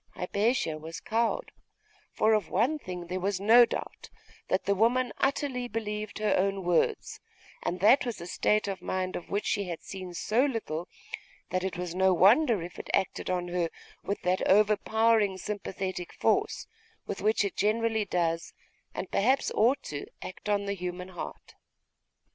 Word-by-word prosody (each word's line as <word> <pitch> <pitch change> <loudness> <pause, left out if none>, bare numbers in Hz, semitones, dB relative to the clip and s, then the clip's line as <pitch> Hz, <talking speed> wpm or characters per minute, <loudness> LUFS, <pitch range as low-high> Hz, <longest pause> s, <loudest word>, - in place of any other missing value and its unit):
Hypatia 200 -3 0
was 160 +2 -7
cowed; 235 - -1 0.6
for 220 +1 +3
of 210 -5 +1
one 255 +11 +1
thing 180 -7 -6
there 180 +2 -3
was 195 0 -1
no 230 +4 +7
doubt, - - -6 0.4
that 185 - 0
the 200 - +3
woman 240 +5 +2
utterly 270 -2 0
believed 215 -2 -4
her 215 0 +1
own 195 0 0
words; 175 -1 0 0.4
and 180 - -3
that 230 +8 +6
was 240 -4 -4
a 170 - -7
state 210 +4 +1
of 195 -1 -4
mind 185 0 -2
of - - -6
which 205 +1 -1
she 205 -2 0
had 170 -3 -6
seen 185 -2 -7
so 225 +8 +2
little, 215 - -2 0.6
that 185 0 0
it 190 -2 -3
was 180 -1 -4
no 190 0 +3
wonder 220 - +5
if 175 - -9
it - - -8
acted 190 - -1
on 180 -1 -1
her 175 -1 0 0.3
with 200 - -2
that 180 +1 +1
overpowering 215 0 +3
sympathetic 190 -2 -4
force, - - +1 0.4
with 200 - -5
which 215 0 +2
it 200 - -3
generally 220 +1 +1
does, 170 -3 -1 0.4
and - - -5
perhaps 260 +7 +2
ought 240 +6 +3
to, 145 -1 -6 0.2
act 185 - -7
on 200 -1 +1
the 200 - -1
human 180 -1 -5
heart. 175 -2 -8
200 Hz, 165 wpm, -29 LUFS, 180-220 Hz, 0.6 s, no